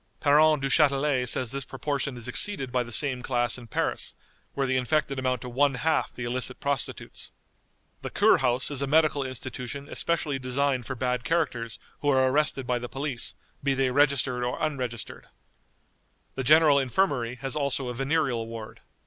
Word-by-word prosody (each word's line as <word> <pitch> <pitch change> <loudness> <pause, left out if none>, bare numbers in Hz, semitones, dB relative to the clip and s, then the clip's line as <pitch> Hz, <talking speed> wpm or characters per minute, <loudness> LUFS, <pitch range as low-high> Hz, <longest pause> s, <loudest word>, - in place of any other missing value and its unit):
Parent 150 0 +4
Duchatelet 135 -2 +3
says 120 -1 +2
this 140 0 -3
proportion 140 -1 -3
is 120 0 -4
exceeded 135 -1 -1
by 125 -1 +1
the 120 -1 -6
same 130 +1 0
class 120 -1 0
in 120 - -12
Paris, - - -2 0.4
where 140 - +1
the 130 0 0
infected 135 +1 0
amount 130 -2 -1
to 125 - -7
one 135 +2 +2
half 160 +4 0
the 120 - -7
illicit 125 +1 -2
prostitutes. 140 -3 -4 0.7
The - - -5
"Kurhaus" 125 +1 +3
is 140 -2 +1
a 140 - 0
medical 155 0 +3
institution 130 +1 -6
especially 155 -4 -1
designed 130 -1 0
for 135 - -3
bad 125 0 -1
characters 130 -7 -1 0.2
who 145 - 0
are 130 -1 +4
arrested 145 -1 +1
by 125 0 0
the 120 0 -6
police, 135 -2 -4 0.3
be 140 -1 +1
they 135 -1 +1
registered 135 -2 +2
or 125 0 -2
unregistered. 125 -7 -4 1.1
The 130 - -3
General 150 +1 +6
Infirmary 130 -3 0
has 135 0 -5
also 140 -3 0
a - - -3
venereal 135 -3 0
ward. 115 -1 -8
135 Hz, 165 wpm, -27 LUFS, 125-145 Hz, 1.1 s, General